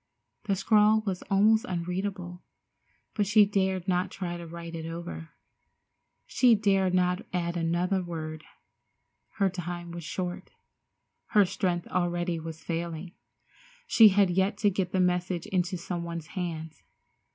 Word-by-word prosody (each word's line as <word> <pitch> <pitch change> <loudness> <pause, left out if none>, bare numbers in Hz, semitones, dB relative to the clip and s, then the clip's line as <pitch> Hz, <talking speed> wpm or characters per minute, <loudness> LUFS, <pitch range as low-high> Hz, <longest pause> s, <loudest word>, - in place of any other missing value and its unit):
The 200 -2 +1
scrawl 215 +2 +4
was 190 -3 -2
almost 215 +3 +4
unreadable, 180 0 -4 0.7
but 205 -2 0
she 210 +1 +6
dared 190 -2 0
not 180 0 +1
try 175 -3 -5
to 170 -1 -8
write 170 0 -8
it 165 -1 -5
over. 165 -1 -7 1.0
She 245 -3 +4
dared 195 -3 +2
not 180 +1 +2
add 175 -1 -2
another 175 +3 0
word. 155 -3 -6 0.9
Her 195 - +2
time 175 -1 -5
was 170 0 -7
short. 180 +3 -4 0.9
Her 205 - +7
strength 175 -1 -1
already 175 -1 -1
was 160 0 -8
failing. 170 0 -4 0.7
She 225 - +7
had 195 -1 +3
yet 190 +3 +1
to 205 - +6
get 185 -1 -2
the 190 - 0
message 180 -1 0
into 185 0 -1
some 175 0 -4
one's 170 -2 -6
hands. 160 -3 -5
180 Hz, 140 wpm, -28 LUFS, 170-195 Hz, 1.0 s, Her